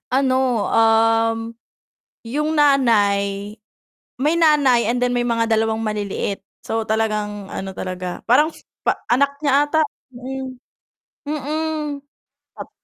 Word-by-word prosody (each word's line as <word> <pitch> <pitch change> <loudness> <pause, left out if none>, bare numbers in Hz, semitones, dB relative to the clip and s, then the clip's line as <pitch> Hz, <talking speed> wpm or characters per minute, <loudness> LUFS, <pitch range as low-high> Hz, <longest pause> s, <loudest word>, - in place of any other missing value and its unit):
Ano, 265 -1 +2 0.4
um, 225 0 +3 0.9
yung 300 +7 -2
nanay 205 -8 +2 0.6
may 295 +5 +2
nanay 290 -7 +4
and 245 - 0
then 245 0 +1
may 245 - +1
mga 230 -1 +1
2 220 0 +1
maliliit 205 -2 -3 0.2
so 225 0 -1
talagang 215 -2 -1
ano 190 0 -5
talaga, 180 -1 -5
parang 295 +7 +4 0.4
pa - - +2
anak 280 +3 +2
niya 285 - +2 0.2
ata, 315 +1 +2 0.3
mm. 260 +1 -6 0.7
Mm. 300 0 -3 0.6
Ap - - -8
240 Hz, 110 wpm, -20 LUFS, 215-280 Hz, 0.9 s, nanay